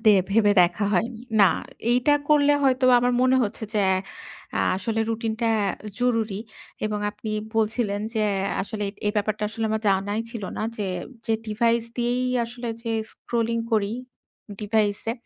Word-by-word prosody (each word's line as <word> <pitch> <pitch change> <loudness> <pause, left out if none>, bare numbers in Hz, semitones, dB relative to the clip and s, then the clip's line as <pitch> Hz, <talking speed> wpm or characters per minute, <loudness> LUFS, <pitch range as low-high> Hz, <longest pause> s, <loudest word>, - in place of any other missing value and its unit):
দে 215 -1 +7 0.2
ভেবে 205 -1 +4
দেখা 175 +4 +1
হয়নি। 225 +5 0 0.2
না, 195 - +8 0.4
এইটা 250 +4 +4
করলে 290 -1 +5
হয়তো 260 -1 +3
বা - - +7
আমার 245 +1 +2
মনে 255 0 +4
হচ্ছে 220 +1 -3
যে 210 - +3 0.7
অ্যা - - 0 0.2
আসলে 225 +2 -1
রুটিনটা 225 0 -1 0.5
জরুরি 225 -4 +1 0.5
এবং 210 -1 -2
আপনি 210 +1 -7 0.3
বলছিলেন 215 -2 0
যে 215 - +1 0.3
অ্যা - - -2
আসলে 210 +1 -5
এই, - - -6
এই 210 - +2
ব্যাপারটা 210 +1 -1
আসলে 225 +1 -4
আমার 220 0 -1
জানাই 200 +3 +1
ছিল 230 -4 -6
না। - - -2
যে, 205 -2 -2 0.4
যে 225 - +2
ডিভাইস 230 +2 +1
দিয়েই 245 +1 0 0.2
আসলে 240 0 -6
যে 230 - -3 0.2
স্ক্রলিং 230 -1 -1
করি, 210 -1 +2 0.7
ডিভাইস 210 -1 +1
এ। - - 0
225 Hz, 160 wpm, -24 LUFS, 210-235 Hz, 0.7 s, না